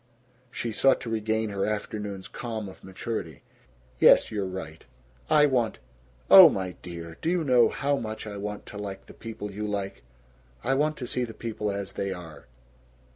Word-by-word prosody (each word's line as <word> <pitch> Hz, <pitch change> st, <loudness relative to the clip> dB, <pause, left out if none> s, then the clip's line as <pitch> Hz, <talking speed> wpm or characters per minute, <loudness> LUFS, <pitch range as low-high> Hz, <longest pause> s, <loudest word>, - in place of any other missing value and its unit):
She 120 Hz, -1 st, -4 dB
sought 135 Hz, +5 st, +3 dB
to 115 Hz, -, -5 dB
regain 110 Hz, 0 st, 0 dB
her 100 Hz, -1 st, -1 dB
afternoon's 105 Hz, -2 st, -3 dB
calm 110 Hz, -3 st, -5 dB
of 95 Hz, -, -12 dB
maturity. 95 Hz, -, -5 dB, 0.6 s
"Yes. -, -, +6 dB
You're 100 Hz, -3 st, -2 dB
right. 80 Hz, -4 st, -7 dB, 0.5 s
I 150 Hz, -1 st, +6 dB
want 125 Hz, -5 st, +1 dB, 0.5 s
oh, 190 Hz, -4 st, +11 dB
my 95 Hz, -8 st, -3 dB
dear, 85 Hz, -2 st, -8 dB
do 165 Hz, -, 0 dB
you 175 Hz, -1 st, +1 dB
know 125 Hz, -5 st, +5 dB
how 140 Hz, 0 st, 0 dB
much 110 Hz, -2 st, -5 dB
I 105 Hz, -1 st, -6 dB
want 105 Hz, +1 st, -5 dB
to 105 Hz, -, -9 dB
like 100 Hz, -2 st, -6 dB
the -, -, -13 dB
people 110 Hz, -2 st, -7 dB
you 105 Hz, +2 st, -4 dB
like? 100 Hz, -8 st, -3 dB, 0.6 s
I 135 Hz, -, +1 dB
want 150 Hz, +3 st, +1 dB
to 125 Hz, -, -5 dB
see 125 Hz, +1 st, -1 dB
people 110 Hz, -2 st, -4 dB
as 100 Hz, -1 st, -5 dB
they 100 Hz, 0 st, -2 dB
are." 80 Hz, -7 st, -9 dB
105 Hz, 175 wpm, -27 LUFS, 95-120 Hz, 0.6 s, oh